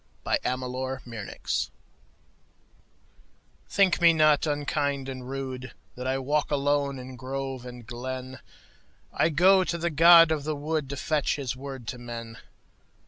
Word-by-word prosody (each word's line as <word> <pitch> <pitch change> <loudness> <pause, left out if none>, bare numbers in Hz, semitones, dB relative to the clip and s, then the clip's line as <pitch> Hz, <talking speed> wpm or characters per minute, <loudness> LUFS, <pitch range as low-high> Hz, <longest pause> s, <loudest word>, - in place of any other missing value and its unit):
The - - +1
Apology 125 -3 -3 2.0
THINK 190 -3 +3
me 170 -1 +7
not 155 -1 +4
unkind 145 -2 -1
and 130 -1 -6
rudeThat 130 -1 -7
I 130 +1 +1
walk 145 +3 0
alone 145 -1 +1
in 130 0 -9
grove 130 0 -5
and 120 -2 -10
glen;I 130 +5 -5
go 185 +5 +5
to 170 - -2
the 170 0 -1
god 165 +1 +8
of 155 -3 0
the 155 +1 -2
woodTo 145 -1 -3
fetch 150 +1 0
his 135 -3 -3
word 135 -2 -8
to 125 - -6
men. 115 -1 -7
135 Hz, 125 wpm, -27 LUFS, 130-150 Hz, 2.0 s, god